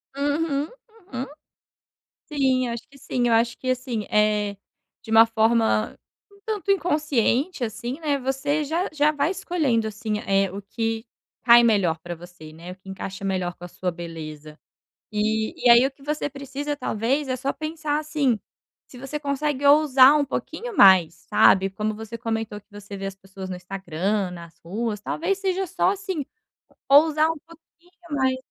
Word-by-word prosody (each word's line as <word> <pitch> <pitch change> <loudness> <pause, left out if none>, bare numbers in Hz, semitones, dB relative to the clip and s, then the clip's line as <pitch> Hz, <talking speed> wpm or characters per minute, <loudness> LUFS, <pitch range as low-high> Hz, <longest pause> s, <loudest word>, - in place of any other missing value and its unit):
Uhum, 285 +1 0 0.5
uhum. 255 +1 -2 1.1
Sim, 260 -3 +2
eu - - -3
acho 235 - -9
que 275 - -18
sim. 245 -2 -1
Eu 230 - +3
acho 230 +1 +1
que, 255 - -2
assim, 250 -4 -2
eh, 210 -1 +2 0.5
de 225 - -10
uma 225 +1 +7
forma 225 -1 +1 0.3
um 400 0 -22
tanto 420 -3 -2
inconsciente, 305 - +1
assim, 240 +4 -5
né, 295 -3 0
você 275 +3 -1
já 330 +5 -1
já 300 0 +3
vai 295 +2 0
escolhendo, 330 - 0
assim, 215 0 -3
eh, 195 -1 +2
o 200 - -6
que 225 +2 -3 0.4
cai 240 0 +8
melhor 200 -8 +2
para 175 +2 -7
você, 170 -2 -13
né, 170 +3 -9
o - - -9
que 195 0 -18
encaixa 190 0 -6
melhor 185 -2 -1
com 175 - -12
a - - -7
sua 180 +1 -3
beleza. 155 -3 -9 0.5
E 220 +1 0
e - - +7
aí 235 +2 +8
o 270 - -1
que 275 +1 -21
você 295 0 -2
precisa 280 +1 -5
talvez 260 +3 -1
é 255 - -1
só 270 +2 -2
pensar 310 -1 -2
assim: 295 -7 0 0.5
"Se 250 - -14
você 275 +4 -5
consegue 285 -1 -2
ousar 280 -2 +7
um 290 - +1
pouquinho 460 - -5
mais", 185 - +7
sabe, 195 0 +5
como 210 +2 -3
você 220 +2 -7
comentou 225 -2 -3
que 205 - -31
você 205 0 -9
vê 195 - -5
as 195 0 -5
pessoas 190 0 -10
no 185 - -4
Instagram, 190 +1 -2
nas 170 -2 -11
ruas, 210 +5 -3
talvez 370 - -2
seja 385 -1 -1
só, 370 +1 +1
assim, 380 -7 -4 0.6
ousar 310 +2 +5
um 325 - -6
pouquinho 335 +2 -21 0.3
mais. 260 -1 +1
240 Hz, 175 wpm, -24 LUFS, 200-290 Hz, 1.1 s, cai